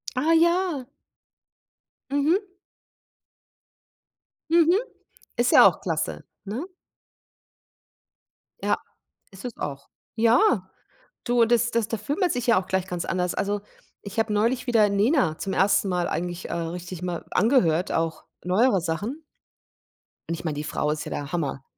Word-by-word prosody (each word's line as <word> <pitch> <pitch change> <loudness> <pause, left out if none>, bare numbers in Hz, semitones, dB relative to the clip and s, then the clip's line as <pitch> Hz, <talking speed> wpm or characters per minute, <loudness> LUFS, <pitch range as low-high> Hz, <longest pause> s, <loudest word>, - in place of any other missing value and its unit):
Ah, 310 +6 +2
ja. 340 -5 +2 1.2
Mhm. 295 +8 +2 2.1
Mhm. 340 +3 +5 0.6
Ist 240 +1 +2
ja - - +9
auch - - -1
klasse, - - -2 0.2
ne? 240 - -4 2.0
Ja. - - +2 0.5
Ist 190 +4 -11
es 245 - -5
auch. 140 -1 -6 0.3
Ja, 230 - +3 0.6
du, 240 -1 +3
das 240 +1 +2
das 230 -2 0
da 225 - -2
fühlt 275 - -3
man 365 -3 +2
sich 245 0 -3
ja 230 -6 +5
auch 185 - -14
gleich 190 0 -1
ganz 180 -2 -4
anders. 180 -1 -1
Also, 200 0 -1 0.4
ich 200 +2 -9
habe 220 -1 +1
neulich 235 +5 +1
wieder 220 -4 +4
Nena 200 - +2
zum 195 - -4
1. 195 +1 +3
Mal 180 -2 0
eigentlich, 175 +1 -4
äh, - - -3
richtig 170 +1 -5
mal 175 -2 -3
angehört, 185 - +2
auch 165 -1 -2 0.2
neuere 195 +2 +3
Sachen. 210 - -3 1.1
Und 170 - 0
ich - - -9
meine, 155 -3 -2
die 150 - -4
Frau 150 -1 -1
ist 155 0 -3
ja - - -5
der 145 +1 -4
Hammer. 145 -5 -2
205 Hz, 145 wpm, -25 LUFS, 175-250 Hz, 2.1 s, ja